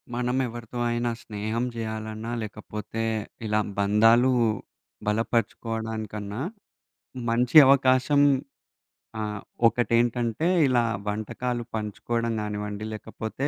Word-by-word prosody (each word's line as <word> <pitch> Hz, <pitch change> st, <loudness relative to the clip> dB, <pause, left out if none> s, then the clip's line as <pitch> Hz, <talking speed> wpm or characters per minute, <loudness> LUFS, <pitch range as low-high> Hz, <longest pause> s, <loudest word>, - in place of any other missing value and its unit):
మనం 125 Hz, +1 st, 0 dB
ఎవరితో 120 Hz, 0 st, -8 dB
అయినా 120 Hz, 0 st, 0 dB
స్నేహం 110 Hz, +3 st, -3 dB
చేయాలన్నా 110 Hz, 0 st, -4 dB
లేకపోతే 105 Hz, +1 st, -6 dB, 0.4 s
ఇలా 105 Hz, 0 st, +1 dB, 0.2 s
బంధాలు 115 Hz, +5 st, +5 dB, 0.8 s
బలపరుచుకోవడానికన్నా 110 Hz, -1 st, -2 dB, 0.9 s
మంచి 120 Hz, +4 st, +1 dB
అవకాశం 135 Hz, +1 st, +4 dB, 1.0 s
ఆహ్, 105 Hz, -1 st, -3 dB, 0.3 s
ఒకటేంటంటే, 120 Hz, +4 st, +1 dB, 0.2 s
ఇలా 125 Hz, -3 st, +3 dB, 0.2 s
వంటకాలు 120 Hz, +4 st, -2 dB
పంచుకోవడం 115 Hz, +2 st, -2 dB
గానివ్వండి 105 Hz, 0 st, -4 dB
లేకపోతే 110 Hz, +4 st, -4 dB
115 Hz, 80 wpm, -26 LUFS, 105-120 Hz, 1.0 s, బంధాలు